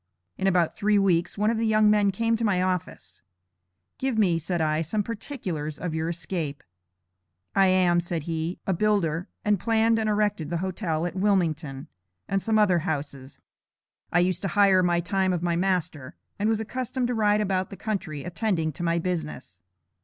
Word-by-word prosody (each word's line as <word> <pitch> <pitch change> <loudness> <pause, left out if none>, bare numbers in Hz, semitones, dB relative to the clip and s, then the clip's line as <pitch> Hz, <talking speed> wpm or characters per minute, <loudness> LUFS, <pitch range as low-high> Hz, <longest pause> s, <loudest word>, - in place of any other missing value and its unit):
In 190 - -1
about 175 -3 +2
three 210 0 +2
weeks, 175 -3 +1
one 210 +2 +2
of 225 - -1
the 225 - +1
young 215 -1 +4
men 205 -1 +3
came 230 +4 +1
to 230 - -3
my 205 -5 +2
office. 185 -2 -4 0.8
Give 260 -3 -1
me, 180 -6 +3
said 170 +2 -2
I, 155 0 +1
some 205 +6 -1
particulars 190 - -5
of 180 -3 -4
your 160 +1 -1
escape. 165 -4 -4 0.9
"I 195 -1 +4
am," 180 -2 +3
said 170 -2 -3
he, 165 +2 -3
"a 190 - +1
builder, 180 -4 +1 0.2
and 210 -2 +2
planned 225 +2 +2
and 220 -1 0
erected 205 -7 0
the 170 - -1
hotel 175 -3 -2
at 175 - -3
Wilmington, 165 -7 0 0.4
and 195 0 0
some 220 +2 +1
other 195 -5 +4
houses. 145 -5 -5 0.7
I 175 - +4
used 180 0 0
to 195 - -1
hire 195 -2 +6
my 175 -1 +2
time 190 +1 0
of 175 -1 -2
my 170 -1 +1
master, 170 -7 -1 0.2
and 210 +2 +1
was 220 -1 +1
accustomed 250 +3 -3
to - - 0
ride 210 -2 +2
about 190 -2 0
the 195 - -9
country 170 -10 -4
attending 175 -3 -1
to 150 - -9
my 170 0 +1
business. 160 - -4
185 Hz, 185 wpm, -26 LUFS, 165-210 Hz, 0.9 s, hire